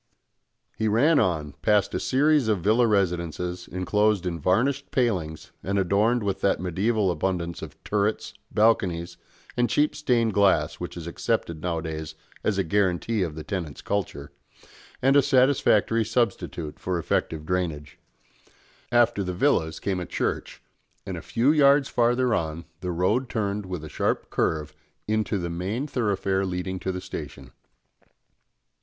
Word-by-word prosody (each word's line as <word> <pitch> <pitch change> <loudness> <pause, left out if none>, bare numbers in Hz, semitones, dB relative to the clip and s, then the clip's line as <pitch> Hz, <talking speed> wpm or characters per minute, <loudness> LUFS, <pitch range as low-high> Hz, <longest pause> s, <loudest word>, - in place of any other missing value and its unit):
He 110 - -1
ran 140 +9 +4
on, 80 -5 0
past 105 -2 +2
a - - 0
series 145 -1 +3
of 105 -5 +1
villa 110 +6 +3
residences 90 -3 -1
enclosed 105 +1 +1
in 85 -2 -2
varnished 125 - +1
palings 90 - -1
and 100 +2 -1
adorned 105 +5 +2
with 100 -2 -2
that 100 - +2
mediæval 95 +3 +1
abundance 85 0 -2
of - - -9
turrets, 105 +1 -1 0.2
balconies, 95 -6 +1 0.4
and 120 -1 +1
cheap 150 +1 +2
stained 120 -7 +1
glass, 100 -1 +2
which - - -6
is 85 - -6
accepted 85 -1 -2
nowadays 80 -2 -4 0.3
as 105 -3 0
a 95 - +2
guarantee 100 +4 0
of 80 -5 -2
the 80 - -6
tenant's 85 -6 -5
culture, 75 -8 -3 0.7
and 135 +1 +4
a 145 - +7
satisfactory 125 -4 +3
substitute 110 -9 -2
for 90 -1 -2
effective 80 -2 -1
drainage. 80 -4 -3 0.9
After 120 -4 +3
the 90 -1 -3
villas 85 - +1
came 95 -2 -2
a 90 - -5
church, - - -3 0.4
and - - -4
a - - -6
few 125 +5 +2
yards 140 -2 +5
farther 120 0 +2
on 80 -3 -2
the 90 - -4
road 105 +9 +1
turned 105 -2 -2
with 90 -4 -5
a - - -6
sharp - - -1
curve 75 -1 -1 0.3
into 110 0 0
the 85 -2 -3
main 95 +10 -2
thoroughfare 100 -7 0
leading 95 0 -3
to 95 - -2
the 90 0 -5
station. - - -8
100 Hz, 150 wpm, -25 LUFS, 85-115 Hz, 0.9 s, a